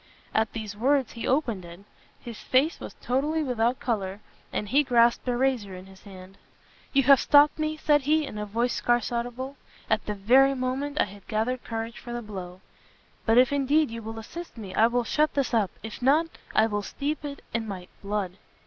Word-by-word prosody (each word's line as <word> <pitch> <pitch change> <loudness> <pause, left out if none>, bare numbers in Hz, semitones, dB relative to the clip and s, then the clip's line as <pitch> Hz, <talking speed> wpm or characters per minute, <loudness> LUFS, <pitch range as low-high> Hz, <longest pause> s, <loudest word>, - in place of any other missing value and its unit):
At 220 0 +1
these 215 -2 -5
words 265 +3 +2
he 230 - -5
opened 240 -9 0
it; 170 +2 -11 0.4
his 235 -3 -9
face 275 +6 +1
was - - -8
totally 295 +5 0
without 245 -2 0
colour, 200 -5 -2 0.3
and 210 - -3
he 275 +8 +4
grasped 240 -3 +3
a 245 -1 +1
razor 245 -7 0
in 185 +1 -10
his 190 0 -16
hand. 190 -1 -12 0.5
"You 275 -1 +3
have 275 0 +7
stopt 290 +1 +5
me," 310 0 -1
said 295 -1 +3
he, 305 +3 +2
in 210 - -7
a 210 - -4
voice 235 +4 0
scarce 240 -1 +1
audible, 245 +3 -4 0.3
"at 220 -1 +2
the 210 - -2
very 260 +7 +4
moment 270 +3 -2
I - - +4
had 200 -1 -14
gathered 235 +4 -1
courage 225 0 -5
for 240 - -8
the 240 0 -4
blow: 185 -3 -8 0.7
but 225 +1 +4
if 255 +2 +5
indeed 285 0 +2
you 230 0 -6
will 225 +1 -7
assist 330 +8 -8
me, 200 -4 -7
I 225 - +5
will 245 +1 0
shut 300 +6 +1
this 275 -3 0
up, 215 -5 +2
if 220 +2 -7
not, 290 +6 +4 0.3
I 220 - +5
will 205 -2 -1
steep 295 +9 -4
it 285 -1 -7
in 230 -1 -2
my 185 -3 -6
blood!" 200 -2 -3
240 Hz, 205 wpm, -26 LUFS, 210-275 Hz, 0.7 s, have